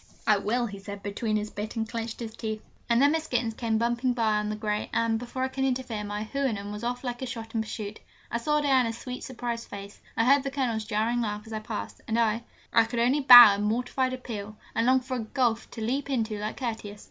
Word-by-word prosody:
'I 215 -2 +5
will,' 235 +5 0
he 200 -3 -7
said 200 0 -8
between 215 +2 -2
his 210 0 -2
bit 210 +3 -5
and 225 -1 -1
clenched 230 0 -4 0.2
teeth. 220 -1 -4 0.3
And 235 0 +4
then 285 +2 +5
Miss 320 0 -1
Gittens 240 -2 0
came 225 -1 0
bumping 240 +2 +1
by 220 -3 +2
on 210 0 -1
the 215 - -2
grey, 210 -1 -2
and, 230 -1 +1
before 245 +2 -4
I - - +2
could 265 0 -3
interfere, 250 -5 -1
my 205 +1 -3
Houyhnhnm 220 -5 -2
was 210 +2 -6
off 245 +1 -2
like 245 -1 -4
a 260 - -3
shot 230 -3 -7
in 225 - +1
pursuit. 215 -1 -6 0.3
I 235 - 0
saw 300 +5 +1
Diana's 255 -5 +2
sweet, 250 +1 -6
surprised 235 -2 -4
face: 200 0 -9 0.2
I 225 - +3
heard 275 +2 +6
the 275 - -3
Colonel's 245 -6 -1
jarring 225 +3 0
laugh 210 -2 -3
as 220 - -9
I 215 - -2
passed, 215 0 -6
and 225 - 0
I 230 0 +1 0.3
I 230 - +6
could 235 +1 -5
only 250 +5 +3
bow 245 -5 +11
in 200 - -2
mortified 250 +4 0
appeal, 215 -5 -6 0.2
and 230 - +1
long 260 0 +5
for 255 0 -4
a - - -3
gulf 230 +1 0
to 225 - -8
leap 265 +6 -1
into 225 -5 -1
like 210 +1 -4
Curtius! 220 -5 -4
230 Hz, 240 wpm, -27 LUFS, 215-250 Hz, 0.3 s, bow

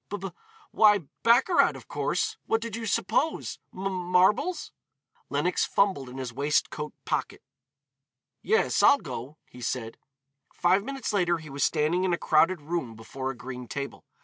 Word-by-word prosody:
"B 205 - -3
b, 195 -1 -6 0.4
why 210 -2 +5 0.2
baccarat 250 +10 +4
of - - -12
course. - - -1
What 225 - +2
did 230 -2 -5
you 230 -1 -4
suppose? 280 +10 0
M 185 - -8
marbles?" 185 - +2 0.6
Lenox - - +1
fumbled 190 -10 +1
in 125 - -9
his 130 -3 -5
waistcoat 150 +2 -1
pocket. - - -2 1.0
"Yes, 450 +1 +2
I'll 285 - +7
go," 140 - -7
he 125 - -14
said. 115 -1 -4 0.5
Five 185 +3 +2
minutes 270 -2 -4
later 175 -4 +2
he 155 -3 -11
was 140 +1 -1
standing 160 +4 +1
in 185 -2 +1
a - - +1
crowded 165 +2 +3
room 150 -7 -3
before 130 +4 -5
a 135 - -4
green 125 +1 -7
table. 140 +2 -6
175 Hz, 155 wpm, -27 LUFS, 135-205 Hz, 1.0 s, I'll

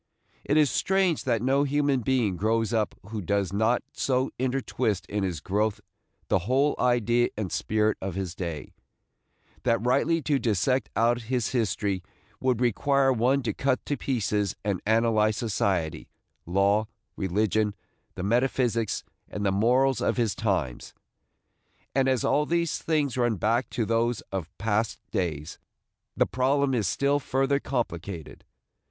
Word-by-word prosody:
It 145 - +1
is 150 -4 +4
strange 190 -4 +1
that 115 -3 +1
no 135 +2 +3
human 145 -1 +1
being 120 -6 +1
grows 110 +3 0
up 110 -2 0
who 110 -1 -4
does 100 0 -1
not 110 +4 +2
so 130 0 0
intertwist 125 -7 -1
in 105 +4 -3
his 90 -5 -2
growth 105 +5 0 0.5
the - - +2
whole 140 +3 +3
idea 120 -1 +2
and 105 -4 -3
spirit 110 0 0
of 95 -2 -4
his 95 -3 -3
day, 85 -5 -5 0.9
that 115 -1 +1
rightly 140 +7 +2
to 145 -1 +1
dissect 120 +2 +1
out 120 +3 +2
his 125 -3 0
history 105 -5 -1 0.4
would 130 -2 0
require 135 +3 +3
one 130 +4 +2
to 120 - -1
cut 135 -1 0
to 145 - -1
pieces 105 -7 -1
and 100 -3 -1
analyze 110 -1 +3
society, 90 -8 -1 0.4
law, 100 +4 +2 0.3
religion, 105 +2 0 0.4
the 90 - -5
metaphysics 120 0 +1 0.3
and 105 -1 -4
the 100 - +3
morals 125 +6 +2
of - - 0
his 115 -4 +1
times; 90 - -2 1.0
and, 135 0 +2
as 130 -2 +1
all 150 +1 +2
these 170 -1 0
things 150 -5 0
run 120 -2 +2
back 115 +5 0
to 115 - -1
those 115 +1 +1
of 95 -5 -3
past 110 +1 0
days, 80 -4 -3 0.6
the - - +4
problem 135 +2 +1
is 110 -6 +1
still 140 +9 +1
further 135 +1 +1
complicated. 95 - -4
115 Hz, 145 wpm, -27 LUFS, 100-130 Hz, 1.0 s, is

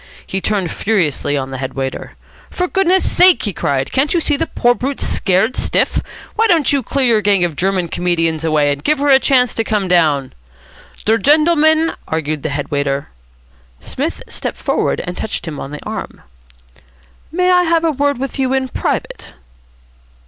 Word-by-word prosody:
He 190 - -3
turned 195 -5 -1
furiously 165 -9 0
on 135 -1 -4
the 130 - -5
head 130 -1 -5
waiter. 135 -1 -5 0.3
"For 360 - -2
goodness' 380 0 +2
sake," 365 -1 +5
he 205 - -2
cried, 140 -3 -1
"can't 280 +5 +1
you - - +3
see 305 -2 0
the 325 +3 -2
poor 240 -3 +2
brute's 260 +4 -3
scared 195 +6 +1
stiff? - - +1 0.4
Why 450 +1 +3
don't 330 -8 +3
you 280 - +2
clear 275 +1 -1
your 225 -3 +3
gang 200 -3 +2
of 170 -3 -1
German 185 +1 0
comedians 165 -2 -1
away, 150 -3 +2
and 140 0 -4
give 305 - +2
her 285 +1 0
a 265 -1 +7
chance 255 -3 +2
to 225 - -1
come 210 -3 -1
down?" 155 -7 +2 0.7
"Der 225 +1 +3
gendleman 315 +2 +3
" - - -32
argued 155 -1 -3
the 155 - -3
head 145 0 -4
waiter. 140 -1 -1 0.7
Psmith - - -4
stepped - - -4
forward - - -1
and 180 - -6
touched 215 -5 -4
him 150 -3 -5
on 135 - -6
the 150 +1 -9
arm. - - -6 1.1
"May 365 +2 +2
I 360 0 +5
have 330 0 +2
a 325 - +2
word 285 -1 0
with 270 +1 -5
you 260 -1 +1
in 265 -1 0
private?" - - -4
215 Hz, 185 wpm, -17 LUFS, -, 1.1 s, a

